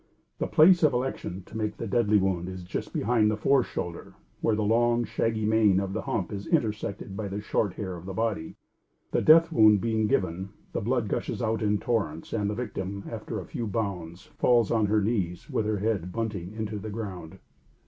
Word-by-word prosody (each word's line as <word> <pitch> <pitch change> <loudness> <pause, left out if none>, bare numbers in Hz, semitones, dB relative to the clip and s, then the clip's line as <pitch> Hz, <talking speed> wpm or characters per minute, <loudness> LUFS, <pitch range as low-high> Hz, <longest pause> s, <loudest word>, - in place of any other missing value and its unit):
The - - 0
place 170 +3 +6
of 150 -4 +4
election 120 -7 -3
to - - -13
make 110 -1 -2
the - - -4
deadly 105 0 +3
wound 95 -2 0
is 95 -1 -7
just 90 - -5
behind 110 -1 +2
the 110 - -1
fore 135 +5 +4
shoulder 85 -7 -6 0.2
where 110 - +1
the 105 - 0
long, 120 +2 +3
shaggy 110 -1 -1
mane 105 -3 +4
of 95 -1 -3
the 110 - -2
hump 100 0 -2
is 100 0 -5
intersected 105 - -1
by 105 0 -3
the 100 +1 -4
short 105 -2 0
hair 95 -4 -4
of 85 +2 -10
the 95 - -4
body. 110 -7 -2 0.6
The - - +1
death 165 +2 +6
wound 110 -7 +6
being 110 0 0
given, 95 -1 0 0.2
the - - -1
blood 120 0 0
gushes - - -2
out 115 -2 -1
in 105 -1 +2
torrents 100 -9 -2
and 105 -2 0
the 105 - -2
victim, 100 -4 -4
after 110 -1 -5
a 90 - -7
few 115 -2 -4
bounds, 95 -4 -4
falls 120 -4 +4
on 110 -2 +2
her 105 +1 +2
knees 95 -6 -2
with 105 - 0
her 110 -1 0
head 100 -4 -1
bunting 100 -5 -3
into 110 -1 -4
the 110 +2 -6
ground. 100 -7 -6
105 Hz, 205 wpm, -27 LUFS, 95-115 Hz, 0.6 s, place